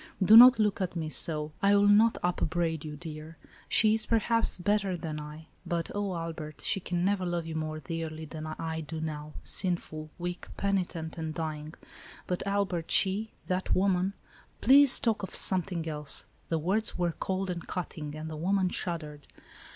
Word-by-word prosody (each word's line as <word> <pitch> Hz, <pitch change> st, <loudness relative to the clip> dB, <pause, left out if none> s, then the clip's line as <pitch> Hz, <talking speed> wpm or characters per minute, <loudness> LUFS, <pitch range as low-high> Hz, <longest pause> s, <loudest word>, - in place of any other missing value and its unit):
Do 210 Hz, +4 st, +7 dB
not 250 Hz, +2 st, +10 dB
look 210 Hz, -2 st, +1 dB
at 185 Hz, -1 st, -2 dB
me 160 Hz, -2 st, -3 dB
so; 155 Hz, -1 st, 0 dB
I 200 Hz, +1 st, +4 dB
will 200 Hz, 0 st, +4 dB
not 215 Hz, +3 st, +5 dB
upbraid 170 Hz, -2 st, -1 dB
you, 150 Hz, -1 st, -6 dB
dear. 155 Hz, +1 st, -9 dB, 0.3 s
She 215 Hz, 0 st, +4 dB
is, 220 Hz, 0 st, +2 dB
perhaps, 230 Hz, 0 st, +1 dB
bet 205 Hz, +3 st, +1 dB
ter 190 Hz, -3 st, -3 dB
than 155 Hz, -2 st, -5 dB
I, 150 Hz, +1 st, -9 dB, 0.2 s
but, 170 Hz, -1 st, -3 dB
oh 205 Hz, -2 st, -2 dB
Albert, 165 Hz, -2 st, -6 dB
she -, -, +1 dB
can 175 Hz, -1 st, -2 dB
never 195 Hz, -1 st, +1 dB
love 175 Hz, -2 st, -2 dB
you 165 Hz, -, -6 dB
more 155 Hz, 0 st, -3 dB
dearly 160 Hz, +1 st, -5 dB
than 155 Hz, +1 st, -7 dB
I 160 Hz, +1 st, -4 dB
do 160 Hz, +1 st, -6 dB
now, 155 Hz, -1 st, -5 dB
sinful, 160 Hz, -4 st, -1 dB
weak, 175 Hz, 0 st, -5 dB
penitent 175 Hz, -5 st, -2 dB
and 160 Hz, -1 st, -4 dB
dying. 155 Hz, -1 st, -5 dB, 0.5 s
But, 180 Hz, -, -2 dB
Albert, 195 Hz, -4 st, -1 dB
she 205 Hz, +3 st, +2 dB
— -, -, -37 dB
that 185 Hz, 0 st, -1 dB
wo 195 Hz, +2 st, +3 dB
man 185 Hz, +1 st, 0 dB, 0.2 s
— -, -, -25 dB
" -, -, -35 dB
"Please 275 Hz, +2 st, +7 dB
talk 230 Hz, -5 st, 0 dB
of 190 Hz, -, -6 dB
something 180 Hz, -3 st, +2 dB
else." 150 Hz, -2 st, 0 dB, 0.2 s
The 165 Hz, -, +1 dB
words 190 Hz, +8 st, -1 dB
were 175 Hz, -2 st, 0 dB
cold 190 Hz, 0 st, -2 dB
and 170 Hz, -2 st, -6 dB
cutting, 155 Hz, -4 st, -5 dB
and 155 Hz, +1 st, -6 dB
the 155 Hz, -1 st, -6 dB
woman 185 Hz, +3 st, +1 dB
shuddered. 155 Hz, -6 st, -5 dB
175 Hz, 190 wpm, -29 LUFS, 155-195 Hz, 0.5 s, not